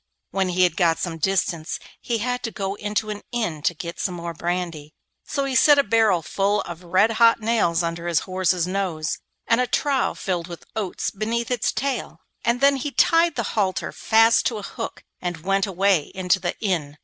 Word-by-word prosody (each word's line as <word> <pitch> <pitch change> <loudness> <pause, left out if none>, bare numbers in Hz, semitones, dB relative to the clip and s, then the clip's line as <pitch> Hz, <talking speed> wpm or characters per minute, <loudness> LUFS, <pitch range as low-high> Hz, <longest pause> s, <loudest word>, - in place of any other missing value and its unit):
When 190 -1 0
he 180 +1 +2
had 180 - +2
got 170 -3 +3
some 165 -2 -4
distance 170 -3 0 0.2
he 235 - -2
had 245 +3 -2
to 225 - -4
go 195 -2 -3
into 210 +1 -2
an 205 - -6
inn 220 -11 -2
to 175 - 0
get 170 +1 -7
some 180 - -2
more 170 0 -5
brandy; 170 -3 -4 0.3
so 280 -2 -1
he 270 - -2
set 290 +3 +6
a 280 - +5
barrel 215 -6 +3
full 200 +4 +1
of 175 0 -8
red 185 +6 +3
hot 230 +1 +5
nails 215 -7 +1
under 170 +1 -3
his 170 -2 +2
horse's 185 -2 0
nose, 180 -5 -2 0.3
and 230 +1 +3
a 250 - 0
trough 275 +1 0
filled 180 -3 -2
with 170 -2 -9
oats 205 -5 -2
beneath 230 +4 -2
its 245 -3 +1
tail, 275 +2 -3 0.2
and 235 +2 +1
then 280 0 +5
he 270 +3 -3
tied 330 +3 +3
the 235 - -1
halter 195 -4 0
fast 225 +1 +4
to 230 - -2
a 205 - -7
hook - - -6 0.2
and 175 -2 -4
went 195 +1 +1
away 190 -4 +2
into 185 0 +2
the 175 -1 -3
inn. 165 -8 -1
195 Hz, 200 wpm, -23 LUFS, 175-230 Hz, 0.3 s, set